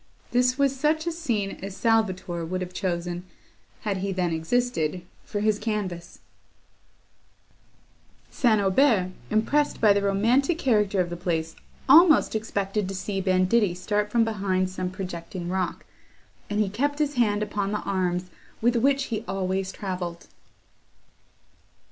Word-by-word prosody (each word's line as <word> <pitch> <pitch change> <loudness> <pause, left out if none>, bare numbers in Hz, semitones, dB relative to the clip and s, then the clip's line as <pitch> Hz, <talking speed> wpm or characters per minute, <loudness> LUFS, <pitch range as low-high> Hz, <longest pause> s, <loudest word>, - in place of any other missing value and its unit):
This 250 +1 +2
was 275 -1 +2
such 305 +4 +1
a 340 - 0
scene 235 -12 -2
as 195 0 -7
Salvator 190 -7 0
would 185 +3 -3
have 180 0 -5
chosen, 175 -2 -3 0.6
had 205 -2 -2
he 195 +1 -2
then 180 -3 0
existed, 175 -1 -1 0.2
for 205 - -4
his 215 -1 +2
canvas; 195 -6 -4 2.1
St. 230 -5 +3
Aubert, 195 -1 +3 0.2
impressed 290 +7 +1
by 210 -3 +6
the 200 - +1
romantic 230 - +2
character 210 - +2
of 175 -1 -3
the - - -3
place, 165 -2 -2 0.3
almost 315 +4 +7
expected 205 -2 -2
to 195 - -4
see 195 +1 -3
banditti 185 +1 +2
start 210 +3 -1
from 230 +1 +3
behind 190 -4 -1
some 185 -1 -3
projecting 180 -1 -6
rock, 185 -1 -2 0.6
and 205 0 -1
he 210 - +2
kept 280 +9 -1
his 295 -1 0
hand 210 -5 +2
upon 205 -1 -2
the 210 - -2
arms 180 -2 -1 0.3
with 240 +2 +2
which 275 +3 +2
he 220 0 -2
always 190 0 -2
travelled. 180 -4 -5
200 Hz, 140 wpm, -25 LUFS, 185-230 Hz, 2.1 s, almost